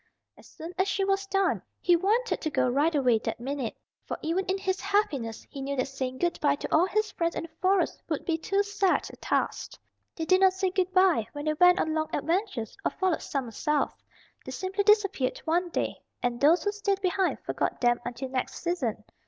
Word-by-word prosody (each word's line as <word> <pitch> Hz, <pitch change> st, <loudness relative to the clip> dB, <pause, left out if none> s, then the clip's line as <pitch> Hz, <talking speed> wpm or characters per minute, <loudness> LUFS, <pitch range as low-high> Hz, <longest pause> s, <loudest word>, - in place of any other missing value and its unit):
As -, -, -17 dB
soon 330 Hz, +3 st, -9 dB
as 380 Hz, -, +3 dB
she 395 Hz, 0 st, 0 dB
was 390 Hz, 0 st, 0 dB
done, 390 Hz, -1 st, +1 dB, 0.2 s
he 350 Hz, -, +4 dB
wanted 435 Hz, +8 st, +1 dB
to 315 Hz, -, -1 dB
go 290 Hz, -, +1 dB
right 290 Hz, +6 st, +2 dB
away 250 Hz, -5 st, +3 dB
that -, -, -4 dB
minute. 265 Hz, -1 st, -4 dB, 0.3 s
For -, -, -5 dB
even 345 Hz, +4 st, 0 dB
in 380 Hz, +1 st, 0 dB
his 380 Hz, 0 st, -2 dB
happiness 310 Hz, -, -1 dB
he 275 Hz, -, -8 dB
knew 280 Hz, +1 st, -2 dB
that 260 Hz, 0 st, -1 dB
saying 260 Hz, -1 st, -4 dB
good 345 Hz, +2 st, 0 dB
by 285 Hz, -1 st, +3 dB
to -, -, -2 dB
all 340 Hz, +4 st, +4 dB
his 430 Hz, +2 st, 0 dB
friends 335 Hz, 0 st, -1 dB
in -, -, -3 dB
the 335 Hz, -, -8 dB
Forest 375 Hz, 0 st, +2 dB
would 310 Hz, -, -2 dB
be 335 Hz, -, +1 dB
too 395 Hz, +5 st, 0 dB
sad 405 Hz, -2 st, +1 dB
a -, -, -9 dB
task. -, -, -2 dB, 0.4 s
They 325 Hz, -, -3 dB
did 370 Hz, +3 st, +4 dB
not 380 Hz, -1 st, +6 dB
say 380 Hz, 0 st, 0 dB
good 375 Hz, -1 st, 0 dB
by 370 Hz, -, +4 dB
when 290 Hz, 0 st, -6 dB
they 310 Hz, -, +2 dB
went 360 Hz, +3 st, +5 dB
on 315 Hz, -, 0 dB
long 315 Hz, 0 st, -1 dB
adventures, 330 Hz, -, -1 dB
or -, -, +2 dB
followed 375 Hz, -4 st, 0 dB
summer 265 Hz, -5 st, -3 dB
south. 300 Hz, +6 st, -1 dB, 0.4 s
They -, -, -7 dB
simply 385 Hz, +2 st, -2 dB
disappeared 400 Hz, -11 st, +3 dB
one 345 Hz, +2 st, +1 dB
day, -, -, -2 dB, 0.2 s
and 240 Hz, -1 st, -1 dB
those 320 Hz, +5 st, +5 dB
who 410 Hz, -, +1 dB
stayed 400 Hz, -1 st, -1 dB
behind 375 Hz, 0 st, +1 dB
forgot -, -, -2 dB
them 240 Hz, -1 st, +2 dB
until 245 Hz, +2 st, -5 dB
next 255 Hz, -1 st, -2 dB
season. 270 Hz, -12 st, -2 dB
345 Hz, 215 wpm, -28 LUFS, 280-385 Hz, 0.4 s, not